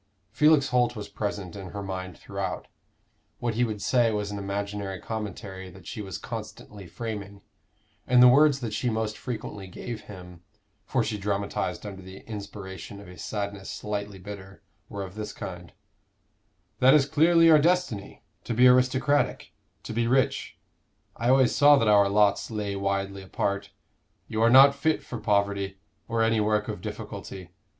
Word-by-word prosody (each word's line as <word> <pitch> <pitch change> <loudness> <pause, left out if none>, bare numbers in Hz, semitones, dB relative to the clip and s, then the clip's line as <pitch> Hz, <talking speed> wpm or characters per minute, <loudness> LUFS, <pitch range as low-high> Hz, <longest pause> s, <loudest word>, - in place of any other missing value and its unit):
Felix 150 +3 +4
Holt 125 -1 +2
was 105 -2 -6
present 100 -3 -4
in 95 -2 -7
her 100 +2 -6
mind 95 -1 -5
throughout; 100 -2 -5 0.7
what 120 -1 -2
he 120 +3 +1
would 110 -4 -3
say 120 -3 +3
was 105 -1 -2
an 100 - -4
imaginary 100 -1 -4
commentary 100 -3 -6
that 90 +1 -15
she 105 - -6
was 95 -2 -6
constantly 100 -3 -8
framing, 100 0 -6 0.6
and 125 0 +5
the 125 - +9
words 140 +2 +5
that 115 -3 -4
she 125 - 0
most 110 -1 -2
frequently 105 -5 -6
gave 110 +4 -7
him 90 -3 -11 0.5
for 130 -3 +1
she 110 -1 -3
dramatized 100 +1 -2
under 95 -2 -7
the 95 +1 -11
inspiration 100 -2 -8
of 100 - -12
a 90 - -11
sadness 100 +2 -5
slightly 105 -1 -4
bitter 95 0 -10 0.3
were 100 -1 -5
of 95 -1 -8
this 105 0 -5
kind: 90 -1 -8 1.1
"That 130 +3 +7
is 145 -3 +5
clearly 165 +4 +4
your 160 -2 +8
destiny 150 - 0 0.2
to 115 - -2
be 125 +2 +5
aristocratic, 130 +3 +2 0.3
to - - -6
be 115 +1 0
rich. 130 +1 +1 0.6
I 120 - -1
always 130 -1 +4
saw 145 0 +7
that 115 - +1
our 100 -1 +5
lots 105 0 +2
lay 105 -3 -3
widely 100 0 -2
apart. 100 +1 -2 0.6
You 110 - -2
are 115 - +5
not 135 +3 +8
fit 155 +3 0
for 120 - -6
poverty, 100 -2 0 0.3
or 115 -1 +1
any 115 0 +2
work 105 0 +1
of - - -5
difficulty. 90 -3 -7
105 Hz, 165 wpm, -27 LUFS, 100-120 Hz, 1.1 s, the